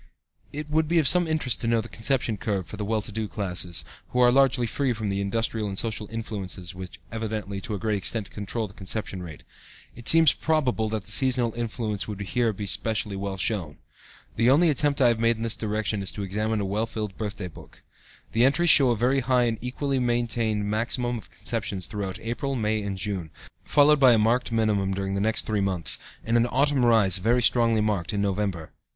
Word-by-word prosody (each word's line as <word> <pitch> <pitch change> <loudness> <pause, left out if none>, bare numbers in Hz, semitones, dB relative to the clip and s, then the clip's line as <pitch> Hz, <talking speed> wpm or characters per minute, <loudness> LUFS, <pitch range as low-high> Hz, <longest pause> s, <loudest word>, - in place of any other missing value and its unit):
It 150 +1 -5
would 155 +1 +1
be 170 +2 +1
of 155 -4 +4
some 180 +2 +5
interest 155 -6 -1
to 115 - -2
know 115 0 +3
the 110 - -5
conception 120 -1 -1
curve 100 -2 -2
for - - -9
the 105 - -4
well 110 0 -1
to 105 - -8
do 110 +1 -3
classes, 90 -4 -3 0.2
who 125 - -2
are 125 -1 +6
largely 135 -1 +3
free 125 +3 0
from 110 -2 -3
the 100 0 -1
industrial 110 +1 -1
and 95 - -6
social 110 -2 -2
influences 100 -5 -5
which 95 0 -9
evidently, 110 -3 -4
to 105 - -4
a - - -3
great 105 +1 -1
extent, 100 +2 -3
control 105 +2 -3
the 100 - -16
conception 100 -1 -4
rate. 80 -4 -9 0.5
It 120 - -1
seems 165 -2 +7
probable 130 -8 0
that 110 -2 -3
the - - -8
seasonal 125 -3 +2
influence 115 -3 -3
would 105 -2 -6
here 115 +4 0
be 105 0 -6
specially 105 +1 -1
well 95 0 -4
shown. 90 -6 -2 0.6
The 115 +2 +4
only 155 +5 +5
attempt 140 0 +2
I 120 - +6
have 115 -1 0
made 115 0 +3
in 115 - -5
this 115 -1 +2
direction 110 -1 -2
is 95 - -4
to 100 - -5
examine 105 +3 -1
a - - -1
well 105 +4 -1
filled 105 -4 -5
birthday 105 -3 -5
book. 80 - -15 0.5
The 115 - +2
entries 145 +6 +4
show 135 -4 +7
a 120 - +1
very 130 +5 +2
high 125 0 +2
and 115 -2 -1
equally 135 +2 -2
maintained 115 -3 0
maximum 120 +3 -1
of - - -15
conceptions 105 -5 -3
throughout 100 -1 -5
April, 125 +4 -3
May 110 -2 0
and 100 -2 -4
June, 95 -4 -4 0.3
followed 150 0 +4
by 130 -3 +7
a - - +4
marked 115 +3 +1
minimum 105 -4 +1
during 95 0 -3
the 100 - -1
next 110 +2 0
three 105 -2 0
months, 95 -4 +1 0.2
and 115 +1 +1
an 120 +1 +3
autumn 135 +1 +2
rise 105 -6 +4
very 120 +6 +2
strongly 115 -2 +3
marked, 105 -3 -1
in 100 - 0
November. 95 -5 -2
110 Hz, 215 wpm, -25 LUFS, 100-120 Hz, 0.6 s, seems